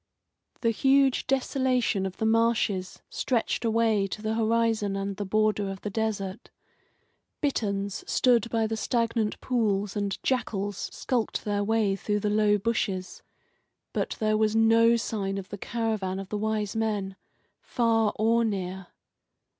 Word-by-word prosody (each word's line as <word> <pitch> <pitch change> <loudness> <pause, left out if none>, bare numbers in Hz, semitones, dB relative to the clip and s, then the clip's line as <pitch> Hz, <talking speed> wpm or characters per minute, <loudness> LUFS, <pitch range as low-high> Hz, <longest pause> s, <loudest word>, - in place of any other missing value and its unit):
The 230 - +2
huge 270 +2 +3
desolation 255 -6 +1
of 185 - -9
the 220 - -1
marshes 220 -4 +1
stretched 245 -1 -1
away 225 -3 +2
to 210 +3 -7
the 215 0 0
horizon 225 -2 +1
and 195 0 -3
the 205 0 -4
border 215 0 +1
of 195 0 -7
the 210 - -4
desert. 205 -2 -3 0.9
Bitterns 200 - -1
stood 235 -3 +3
by 225 -1 +1
the 225 +1 -2
stagnant 230 -1 0
pools 210 -5 0
and 200 -1 -1
jackals 205 -6 -1
skulked 240 -4 -1
through 205 0 0
the 210 - -1
low 210 0 +3
bushes; 200 -3 -2 0.7
but - - -2
there 215 -1 +2
was 215 0 +1
no 225 +1 +5
sign 200 -4 -2
of 195 -1 -6
the 205 - -7
caravan 215 -5 -2
of 195 -1 -6
the 210 - -2
Wise 215 -1 -1
Men, 210 -3 -1 0.5
far 225 -3 +1
or 230 +2 +2
near. 190 -3 -3
215 Hz, 140 wpm, -27 LUFS, 200-230 Hz, 0.9 s, no